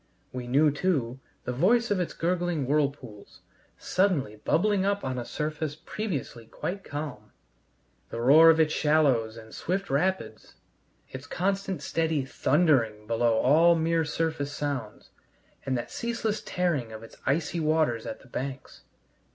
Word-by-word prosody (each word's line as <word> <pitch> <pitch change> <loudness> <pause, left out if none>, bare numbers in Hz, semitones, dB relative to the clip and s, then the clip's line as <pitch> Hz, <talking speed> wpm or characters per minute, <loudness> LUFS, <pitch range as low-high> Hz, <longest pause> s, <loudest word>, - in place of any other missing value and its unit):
We 125 -1 -5
knew, 145 +4 +4
too, 140 -6 -1 0.2
the 125 - -3
voice 220 - +2
of 200 - +2
its 180 - -2
gurgling 175 -3 -1
whirlpools, 135 -7 -2 0.4
suddenly 170 - 0
bubbling 190 - +1
up 200 +1 0
on 130 -1 -2
a 120 - -5
surface 150 +1 -3
previously 150 - -5
quite 195 - -5
calm; 145 -10 -6 0.8
the 115 - -5
roar 150 +7 +7
of 160 0 +5
its 155 -1 +3
shallows 135 -8 +2
and 110 -1 -12
swift 195 +1 -3
rapids; 185 +7 -1 0.6
its 130 +2 -8
constant 195 0 -2
steady 160 -4 0
thundering 120 -9 +2
below 115 0 +1
all 165 +6 +5
mere 165 0 +1
surface 155 -2 -2
sounds; 140 -7 -5 0.6
and 130 -1 +1
that 120 - -5
ceaseless 235 -2 -2
tearing 155 -11 -1
of 110 0 -9
its 115 - -13
icy 155 +4 0
waters 155 -7 +1
at - - -6
the - - -18
banks. 130 +2 -6
150 Hz, 145 wpm, -27 LUFS, 125-175 Hz, 0.8 s, roar